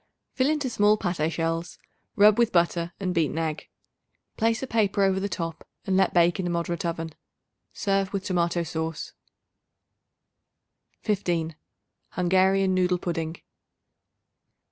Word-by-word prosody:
Fill 260 +1 +2
into 300 -3 0
small 210 -3 +3
pate 170 -5 -1
shells; 165 +1 -2 0.4
rub 210 +2 +6
with 235 -1 +3
butter 170 -1 +1
and 185 -2 -1
beaten 165 -2 0
egg. 160 -2 -3 0.7
Place 225 +1 +1
a - - 0
paper 210 -5 +1
over 190 -1 +2
the 200 +1 -2
top 165 -3 -4 0.2
and 190 - 0
let 190 -1 +3
bake 175 +1 +3
in 180 - -1
a - - -1
moderate 170 0 -2
oven. 165 -1 -4 0.6
Serve 195 -1 0
with 195 -2 -3
tomato 170 -1 0
sauce. 160 -1 -4 1.9
15. 170 -6 -1 0.6
Hungarian 190 +1 +3
Noodle 180 -1 +2
Pudding. 165 -2 -4
180 Hz, 130 wpm, -26 LUFS, 170-195 Hz, 1.9 s, rub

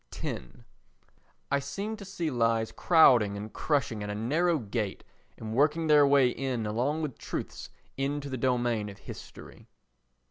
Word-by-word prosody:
x - - -4 1.1
I 140 - +3
seem 195 +11 -4
to 200 - -9
see 175 -5 -3
lies 115 -2 +1
crowding 120 - +5
and 105 +1 -7
crushing 135 -8 -1
at 105 - -4
a 105 - -3
narrow 160 +10 +1
gate 105 -4 -3 0.3
and 110 -1 -6
working 150 +6 +2
their 150 -2 +6
way 140 -2 +5
in 125 -3 -2
along 130 +9 -1
with 145 -5 -5
truths - - -6 0.3
into 140 +1 -2
the 135 - -4
domain 120 -4 0
of 100 - -10
history. - - -11
130 Hz, 150 wpm, -29 LUFS, 110-150 Hz, 1.1 s, their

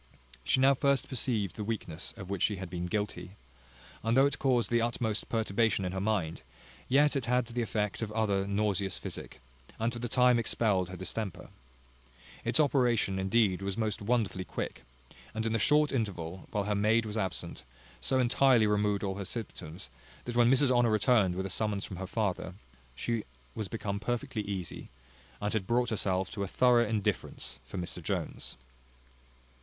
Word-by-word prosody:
She 130 - +3
now 135 +1 +6
first 140 0 +1
perceived 115 - 0
the 105 - -4
weakness 100 -6 -3
of 95 - -7
which 100 -2 -3
she 105 - +2
had 95 -2 -7
been 90 0 -3
guilty; 95 -2 -3 0.7
and 115 +2 +1
though 135 - +7
it 140 - 0
caused 125 -4 +2
the 120 0 +3
utmost 115 -2 -1
perturbation 110 -2 +1
in 90 - -2
her 95 0 -3
mind, 95 -8 -1 0.5
yet 145 +3 +4
it 135 -4 -1
had 125 +1 +2
the 120 +1 -3
effect 105 -2 -1
of 110 -2 -3
other 100 -3 +1
nauseous 100 -2 0
physic, - - -7 0.4
and 115 +2 0
for 120 - -5
the 120 0 -3
time 125 0 +5
expelled 105 -5 +1
her 95 - -7
distemper. 95 +1 -4 0.9
Its - - +1
operation 120 -9 +3
indeed 95 -1 +2
was 100 +1 -3
most 110 -3 -1
wonderfully 105 -4 0
quick; - - -5 0.5
and 110 0 -1
in 115 - +1
the 115 - +1
short 150 +6 +4
interval, 95 -8 -3
while 105 - -1
her 105 +1 0
maid 110 +3 +3
was 105 0 -5
absent, 95 -6 -3 0.4
so 130 - +1
entirely 125 -1 +4
removed 105 -1 +1
all 100 0 -2
symptoms, 95 -5 -6 0.3
that 120 - -4
when 120 0 +5
Mrs 135 +1 +5
Honour 120 -2 +4
returned 110 -4 +3
with 95 +1 -2
a - - -3
summons 105 0 -1
from 95 - -7
her 95 +1 -5
father, 95 -3 -2 0.4
she 115 - -1 0.3
was 110 - -4
become 100 -1 -3
perfectly 115 0 -2
easy, 100 -4 -5 0.5
and 105 0 -1
had 105 -4 -1
brought 120 0 +2
herself 95 -3 0
to 100 - -5
a 100 - -1
thorough 120 +2 +4
indifference 100 - -2
for 65 - -7
Mr 90 0 -4
Jones. 80 - -4
105 Hz, 175 wpm, -31 LUFS, 95-120 Hz, 0.9 s, though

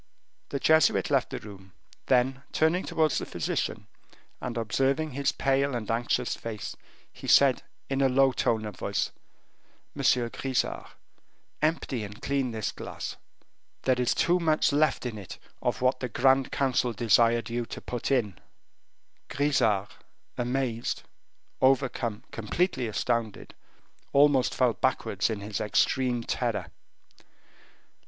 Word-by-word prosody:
The 140 - -2
Jesuit 160 +3 +3
left - - +2
the - - -4
room. 95 -3 -12 0.3
Then, 130 +1 +2
turning 160 +4 +2
towards 155 -3 +1
the - - -4
physician, - - -2 0.6
and 125 -1 -4
observing 135 +7 0
his 140 +1 0
pale 135 0 +1
and 115 -3 -3
anxious 120 +1 0
face, 110 -2 -6 0.4
he - - -10
said, 135 -2 +5 0.3
in 135 0 -1
a 135 - +4
low 135 +1 +4
tone 110 -3 0
of 105 -3 -6
voice: - - -1 0.8
"Monsieur 120 -2 +2
Grisart, 130 +2 -2 0.7
empty 150 -6 0
and 105 0 -8
clean 135 -2 -1
this 110 -2 -3
glass; - - -6 0.7
there 130 -1 +2
is 125 - +1
too 175 +1 +3
much 155 -3 +2
left 150 -2 +2
in 115 -4 -4
it 95 - -9 0.2
of - - -1
what 130 0 +2
the 125 - -3
grand 130 +3 +3
council 125 -3 +1
desired 115 +1 +3
you 120 0 -2
to - - -7
put 120 -2 -4
in." 105 - 0 0.9
Grisart, 110 -9 +1 0.4
amazed, 120 -1 -2 0.6
overcome, 130 -4 +1
completely 125 - -1
astounded, 115 0 -2 0.6
almost 140 -2 +4
fell 125 -3 +3
backwards 105 -6 0
in 110 -2 -3
his 100 0 -4
extreme 120 +3 +1
terror. - - -2
125 Hz, 130 wpm, -28 LUFS, 115-135 Hz, 0.9 s, said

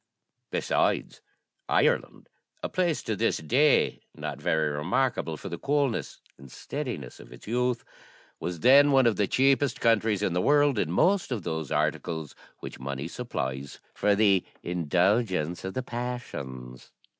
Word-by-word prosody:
Besides, - - 0 0.5
Ireland, - - +1 0.4
a - - -2
place 175 -4 0
to - - -2
this - - +1
day 140 - +2
not - - -6
very 80 -1 +1
remarkable 85 - -1
for - - -8
the 85 -2 -6
coolness 140 -4 -1 0.2
and 70 -2 -13
steadiness 120 - -6
of - - -14
its - - -13
youth, 125 +2 -1 0.5
was 85 -1 -5
then 140 - +7
one 135 -2 +5
of 115 -3 +2
the 105 - +2
cheapest 135 +1 +2
countries 110 -3 +2
in 95 - 0
the 90 - +1
world 145 -3 +3
in 75 - 0
most 185 - +2
of 110 -7 -2
those 80 -4 -4
articles 80 -3 -1 0.3
which - - -8
money 70 +3 -4
supplies 70 - -5
for 105 -1 +2
the 100 -3 +4 0.2
indulgence 90 +1 0
of 95 0 -5
the 130 - -2
passions. 70 - -6
105 Hz, 145 wpm, -27 LUFS, 80-130 Hz, 0.5 s, then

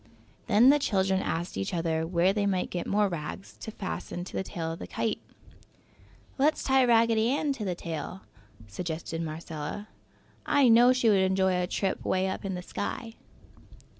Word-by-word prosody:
Then 230 +4 +6
the 295 - +3
children 190 -6 +1
asked 170 +2 -3
each 95 - -2
other 165 -1 -1
where 180 +2 +2
they 205 -1 0
might 185 -2 -1
get 175 - -3
more 205 0 +2
rags 170 +1 -6
to - - -7
fasten 190 -4 -5
to 180 - -10
the - - 0
tail 165 -3 -4
of 165 - -7
the - - -7
kite. 225 -2 -2 1.2
"Let's 300 +3 +2
tie 265 -1 +4
Raggedy 230 -1 +4
Ann 285 +2 +1
to 220 -6 -5
the 180 -2 -1
tail!" 170 +2 -6 0.4
suggested 165 - -5
Marcella. 160 +4 -6 0.5
"I 280 -4 +4
know 240 +2 +7
she 255 -2 +2
would 200 -2 +4
enjoy 190 0 +2
a 180 0 0
trip 190 +1 -2
'way 190 0 +1
up 190 - -4
in 195 -2 -3
the 180 - -6
sky!" 225 +5 -5
190 Hz, 175 wpm, -28 LUFS, 170-225 Hz, 1.2 s, know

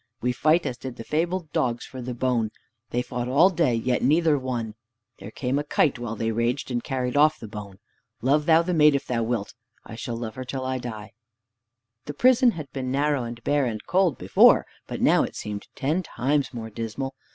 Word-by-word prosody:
We 125 - 0
fight 155 +7 +2
as 130 -3 -3
did 130 -2 -7
the 115 - -8
fabled 165 +3 -2
dogs 120 -2 -1
for 130 - -9
the 125 0 -5
bone. 120 -3 0 0.4
They 125 +1 -1
fought 125 -1 -4
all 155 +9 +5
day, 160 -9 +2
yet 125 +2 0
neither 155 +3 +3
won. 125 -5 -3 0.5
There 100 - -8
came 130 +4 -1
a - - -2
kite 145 -3 +1
while 115 -2 -4
they 115 +1 -1
raged, 120 +4 -1
and 120 -1 -1
carried 130 -2 -2
off 155 +2 +4
the 110 - -8
bone. 105 -3 -9 0.4
Love 145 +4 +2
thou 165 0 +6
the 180 +1 -1
maid 150 -3 +5
if 140 - -2
thou 120 -2 -1
wilt. 115 -3 -2 0.3
I - - -10
shall 115 +1 -5
love 115 -2 -5
her 130 - -6
till 130 +1 -5
I 130 0 -2
die." 110 -3 -7 0.9
The 145 - -6
prison 255 - +5
had 155 -4 -8
been 130 -2 -4
narrow 140 -2 +1
and 120 0 -8
bare 145 -1 +2
and 110 -3 -5
cold 180 -4 +2
before, - - +5 0.2
but - - -5
now - - +5
it - - -3
seemed 105 -1 -6
ten 155 +7 0
times 140 -4 -1
more 115 -3 -7
dismal. 115 +5 -4
130 Hz, 210 wpm, -25 LUFS, 120-150 Hz, 0.9 s, thou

